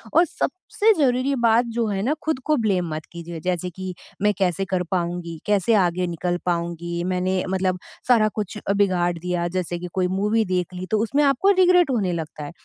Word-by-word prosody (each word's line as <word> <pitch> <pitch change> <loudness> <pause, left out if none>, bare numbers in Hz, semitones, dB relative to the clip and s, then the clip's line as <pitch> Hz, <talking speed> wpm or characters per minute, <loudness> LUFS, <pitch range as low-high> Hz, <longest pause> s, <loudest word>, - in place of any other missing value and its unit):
और 335 +2 +6
सबसे 370 +7 0
ज़रूरी 265 0 +2
बात 230 +2 +4
जो 230 -2 +1
है 195 -2 -1
ना, 270 +7 +1
खुद 315 -4 -1
को 305 - +3
ब्लेम 180 -5 +1
मत 155 0 -5
कीजिए। 170 -1 -7
जैसे 180 +1 -2
कि, 185 +1 -6 0.3
"मैं 210 0 +3
कैसे 190 0 +1
कर 180 -1 -1
पाऊँगी? 170 -2 -2
कैसे 210 +2 +2
आगे 180 +1 -1
निकल 175 +1 -2
पाऊँगी? 170 0 -2
मैंने 185 0 0
मतलब 185 -1 0 0.3
सारा 225 -3 +5
कुछ 210 0 -4
अ, 200 - +3
बिगाड़ 185 -3 +2
दिया।" 175 0 -1
जैसे 175 -1 -3
कि 180 - -5
कोई 185 -1 +1
मूवी 215 +2 +2
देख 180 0 -2
ली, 180 +1 -5
तो 215 - +2
उसमें 280 +6 +1
आपको 280 +8 +3
रिग्रेट 360 -3 +5
होने 200 -8 0
लगता 155 -2 -5
है। - - -7
185 Hz, 200 wpm, -23 LUFS, 175-225 Hz, 0.3 s, और